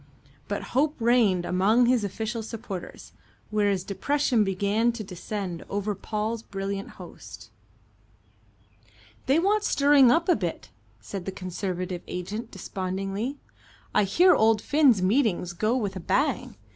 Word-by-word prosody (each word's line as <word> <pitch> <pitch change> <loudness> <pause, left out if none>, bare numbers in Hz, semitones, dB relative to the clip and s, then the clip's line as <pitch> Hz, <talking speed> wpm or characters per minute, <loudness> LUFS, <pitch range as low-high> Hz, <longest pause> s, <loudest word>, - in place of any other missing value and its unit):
But 205 - -3
hope 295 +4 +2
reigned 225 -7 +3
among 205 +8 +3
his 245 -2 +2
official 220 +3 -3
supporters, 220 -5 -7 0.4
whereas 205 -3 +1
depression 250 +3 +1
began 205 +4 +1
to 230 -2 -6
descend 185 -1 -5
over 205 +1 -2
Paul's 215 +3 -3
brilliant 195 -1 -5
host. - - -11 1.8
"They 270 +3 +4
want 405 +5 +2
stirring 280 - +5
up 335 +6 +3
a 360 - +5
bit," 175 -6 -4 0.3
said 180 - -7
the 195 - -3
Conservative 185 -1 -4
agent 205 +6 -5
despondently. 195 +7 -4 0.6
"I 210 - +3
hear 355 - +5
old 220 0 +4
Finn's 270 -7 +3
meetings 190 -5 +1
go 215 +8 0
with 200 -5 -2
a - - -4
bang. 275 - 0
210 Hz, 130 wpm, -26 LUFS, 190-245 Hz, 1.8 s, stirring